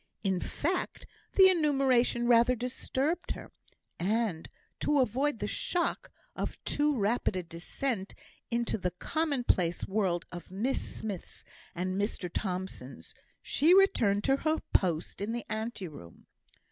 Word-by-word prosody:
In 190 Hz, -3 st, +1 dB
fact, 350 Hz, -, -2 dB, 0.3 s
the 380 Hz, -1 st, +8 dB
enumeration 270 Hz, -8 st, +3 dB
rather 240 Hz, +1 st, +5 dB
disturbed 265 Hz, +7 st, -2 dB
her; -, -, -10 dB, 0.5 s
and 200 Hz, -2 st, 0 dB, 0.3 s
to 295 Hz, -1 st, +2 dB
avoid 265 Hz, +3 st, +1 dB
the 205 Hz, -, -3 dB
shock 345 Hz, -, -1 dB, 0.3 s
of -, -, -3 dB
too 295 Hz, -1 st, +1 dB
rapid 210 Hz, 0 st, +1 dB
a 185 Hz, -, -2 dB
descent 190 Hz, +6 st, -4 dB, 0.3 s
into 235 Hz, -2 st, 0 dB
the 180 Hz, -, 0 dB
commonplace 240 Hz, -, 0 dB
world 190 Hz, -4 st, 0 dB
of 175 Hz, -1 st, -8 dB
Miss 215 Hz, +9 st, -1 dB
Smiths 205 Hz, -5 st, -6 dB, 0.3 s
and 185 Hz, +2 st, -1 dB
Mr 190 Hz, -4 st, -3 dB
Thomsons, 180 Hz, -, -5 dB, 0.3 s
she 325 Hz, +6 st, +4 dB
returned 220 Hz, -, +4 dB
to 270 Hz, 0 st, +3 dB
her 310 Hz, +2 st, +1 dB, 0.2 s
post 175 Hz, -1 st, +1 dB
in 210 Hz, +3 st, -2 dB
the 240 Hz, -1 st, -4 dB
ante 220 Hz, -3 st, -3 dB
room. 140 Hz, -, -12 dB
225 Hz, 130 wpm, -30 LUFS, 185-275 Hz, 0.5 s, the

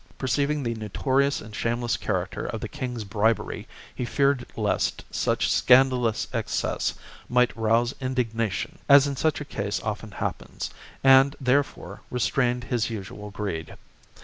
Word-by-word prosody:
Perceiving 140 Hz, +3 st, 0 dB
the 115 Hz, -1 st, -1 dB
notorious 130 Hz, +6 st, 0 dB
and 110 Hz, -1 st, -10 dB
shameless 120 Hz, +1 st, 0 dB
character 95 Hz, -2 st, -2 dB
of 110 Hz, -, -4 dB
the -, -, -3 dB
king's 125 Hz, -6 st, -5 dB
bribery, 110 Hz, +2 st, 0 dB, 0.3 s
he -, -, -4 dB
feared 135 Hz, 0 st, +1 dB
lest 105 Hz, -2 st, 0 dB
such -, -, +1 dB
scandalous 125 Hz, -3 st, +4 dB
excess -, -, -1 dB, 0.3 s
might 125 Hz, 0 st, +3 dB
rouse 115 Hz, +3 st, +2 dB
indignation, 125 Hz, -, -2 dB
as 140 Hz, 0 st, +8 dB
in 140 Hz, -1 st, -2 dB
such 155 Hz, +3 st, +1 dB
a -, -, -5 dB
case 100 Hz, -5 st, -3 dB
often 110 Hz, 0 st, -4 dB
happens, -, -, -4 dB, 0.3 s
and, 135 Hz, +1 st, +6 dB
therefore, 140 Hz, +2 st, 0 dB
CHAP, -, -, -23 dB
restrained 125 Hz, 0 st, 0 dB
his 120 Hz, -3 st, -1 dB
usual 105 Hz, -1 st, -7 dB
greed. 95 Hz, -6 st, -4 dB
120 Hz, 140 wpm, -26 LUFS, 110-135 Hz, 0.3 s, as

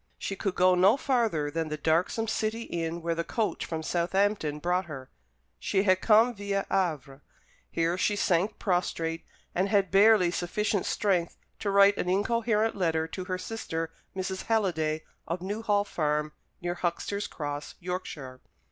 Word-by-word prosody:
She 195 Hz, -, -4 dB
could 195 Hz, -1 st, -2 dB
go 185 Hz, 0 st, +5 dB
no 190 Hz, +7 st, +5 dB
farther 225 Hz, -, 0 dB
than 160 Hz, 0 st, -2 dB
the 155 Hz, -, -3 dB
darksome 170 Hz, +9 st, +1 dB
city 220 Hz, +1 st, -1 dB
inn 170 Hz, -2 st, -4 dB
where 170 Hz, 0 st, 0 dB
the 165 Hz, 0 st, -2 dB
coach 220 Hz, +4 st, -2 dB
from 160 Hz, -1 st, -4 dB
Southampton 175 Hz, -2 st, 0 dB
brought 180 Hz, +4 st, 0 dB
her. 135 Hz, -5 st, -9 dB, 0.5 s
She 195 Hz, -1 st, +1 dB
had 185 Hz, -2 st, +3 dB
come 225 Hz, +2 st, +5 dB
viâ 200 Hz, -2 st, -2 dB
Havre. 150 Hz, -7 st, -1 dB, 0.5 s
Here 170 Hz, +2 st, 0 dB
she 205 Hz, -, +2 dB
sank 195 Hz, +1 st, +1 dB
prostrate, 165 Hz, -4 st, -1 dB, 0.3 s
and 190 Hz, +3 st, +1 dB
had 200 Hz, -4 st, +2 dB
barely 195 Hz, -2 st, +6 dB
sufficient 200 Hz, +3 st, -1 dB
strength 180 Hz, -5 st, 0 dB, 0.2 s
to 205 Hz, -, -2 dB
write 200 Hz, 0 st, +6 dB
an 180 Hz, -, -1 dB
incoherent 220 Hz, +3 st, +1 dB
letter 165 Hz, -4 st, 0 dB
to 185 Hz, +2 st, -5 dB
her 185 Hz, -1 st, -2 dB
sister, 165 Hz, -5 st, -4 dB, 0.2 s
Mrs. 190 Hz, 0 st, -3 dB
Halliday, 160 Hz, -8 st, 0 dB, 0.2 s
of 175 Hz, +2 st, -3 dB
Newhall 205 Hz, +1 st, 0 dB
Farm, 150 Hz, -5 st, -1 dB, 0.3 s
near 175 Hz, 0 st, -1 dB
Huxter's 180 Hz, +4 st, -2 dB
Cross, 145 Hz, -1 st, -5 dB
Yorkshire. 160 Hz, -8 st, -6 dB
185 Hz, 155 wpm, -28 LUFS, 165-205 Hz, 0.5 s, barely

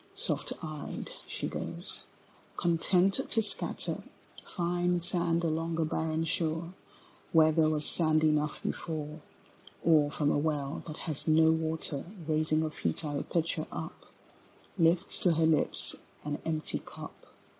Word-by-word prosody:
Soft -, -, -2 dB
eyed 155 Hz, -2 st, -5 dB, 0.2 s
she -, -, -2 dB
goes, -, -, -6 dB, 0.6 s
content 180 Hz, +3 st, +3 dB
to 225 Hz, -, +2 dB
scatter 210 Hz, -, -2 dB, 0.4 s
Fine 175 Hz, 0 st, 0 dB
sand 170 Hz, -1 st, +2 dB
along 165 Hz, 0 st, -1 dB
a 160 Hz, -, +3 dB
barren 160 Hz, +1 st, -1 dB
shore 165 Hz, +1 st, 0 dB, 0.6 s
Where 160 Hz, -1 st, +6 dB
there 155 Hz, 0 st, +4 dB
was 150 Hz, -1 st, +1 dB
sand 155 Hz, -2 st, +4 dB
enough 150 Hz, -1 st, +1 dB
before: 155 Hz, -1 st, -4 dB, 0.6 s
Or 155 Hz, -3 st, +5 dB
from 145 Hz, 0 st, +1 dB
a -, -, +2 dB
well 145 Hz, -2 st, -1 dB
that 155 Hz, -1 st, -6 dB
has 155 Hz, -3 st, -4 dB
no 160 Hz, 0 st, +6 dB
water 160 Hz, -3 st, -1 dB, 0.2 s
Raising 155 Hz, 0 st, +2 dB
a 155 Hz, -, -2 dB
futile 145 Hz, -1 st, -2 dB
pitcher 165 Hz, -1 st, -1 dB
up -, -, -7 dB, 0.7 s
Lifts 170 Hz, 0 st, +3 dB
to 180 Hz, -, +4 dB
her 160 Hz, 0 st, +3 dB
lips 160 Hz, -1 st, +2 dB, 0.3 s
an 150 Hz, 0 st, -2 dB
empty 155 Hz, -1 st, -1 dB
cup. -, -, -11 dB
160 Hz, 135 wpm, -31 LUFS, 155-165 Hz, 0.7 s, Where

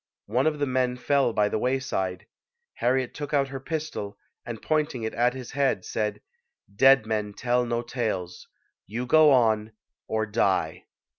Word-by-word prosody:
One 125 Hz, +7 st, +1 dB
of 155 Hz, -1 st, 0 dB
the 145 Hz, -, 0 dB
men 125 Hz, -1 st, 0 dB
fell 135 Hz, 0 st, +2 dB
by 105 Hz, -2 st, +2 dB
the 110 Hz, -, -1 dB
wayside. 125 Hz, -8 st, -2 dB, 0.5 s
Harriet 130 Hz, 0 st, 0 dB
took 145 Hz, 0 st, -3 dB
out 140 Hz, -1 st, +2 dB
her 135 Hz, 0 st, -5 dB
pistol, 150 Hz, -9 st, -5 dB, 0.3 s
and 115 Hz, -2 st, -6 dB
pointing 150 Hz, -5 st, -1 dB
it 110 Hz, -, -3 dB
at 120 Hz, +2 st, +1 dB
his 130 Hz, -2 st, -8 dB
head, 135 Hz, -9 st, 0 dB
said, 105 Hz, -1 st, -2 dB, 0.5 s
"Dead 135 Hz, 0 st, +6 dB
men 105 Hz, -2 st, -2 dB
tell 125 Hz, 0 st, 0 dB
no 120 Hz, 0 st, -1 dB
tales; 100 Hz, -8 st, -4 dB, 0.4 s
you 115 Hz, +5 st, -4 dB
go 155 Hz, +4 st, +6 dB
on 110 Hz, -5 st, +3 dB, 0.3 s
or 110 Hz, 0 st, 0 dB
die!" 105 Hz, -3 st, 0 dB
125 Hz, 160 wpm, -26 LUFS, 110-135 Hz, 0.5 s, Dead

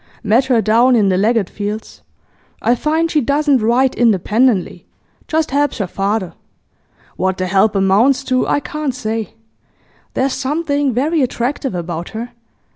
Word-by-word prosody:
'Met 235 Hz, +5 st, +3 dB
her 245 Hz, -4 st, +2 dB
down 235 Hz, +4 st, +4 dB
in 205 Hz, -4 st, +3 dB
the 185 Hz, -, +2 dB
Leggatt 215 Hz, +1 st, +1 dB
fields. 210 Hz, +2 st, -6 dB, 0.6 s
I 240 Hz, -, +2 dB
find 320 Hz, +6 st, 0 dB
she 300 Hz, -, +2 dB
doesn't 285 Hz, +1 st, +2 dB
write 245 Hz, +4 st, +2 dB
independently; 220 Hz, -1 st, +1 dB, 0.4 s
just 320 Hz, -2 st, -1 dB
helps 290 Hz, +1 st, 0 dB
her 200 Hz, -, -1 dB
father. 195 Hz, -1 st, -2 dB, 0.8 s
What 190 Hz, 0 st, -1 dB
the 185 Hz, -, -2 dB
help 195 Hz, +3 st, +2 dB
amounts 215 Hz, +8 st, +3 dB
to 255 Hz, -1 st, 0 dB
I 290 Hz, -, +1 dB
can't 300 Hz, -4 st, -4 dB
say. 225 Hz, -3 st, -4 dB, 0.8 s
There's 265 Hz, +1 st, 0 dB
something 285 Hz, +1 st, -1 dB
very 295 Hz, +7 st, 0 dB
attractive 255 Hz, -1 st, -2 dB
about 170 Hz, -1 st, -5 dB
her. 240 Hz, +2 st, -6 dB
240 Hz, 145 wpm, -17 LUFS, 205-275 Hz, 0.8 s, down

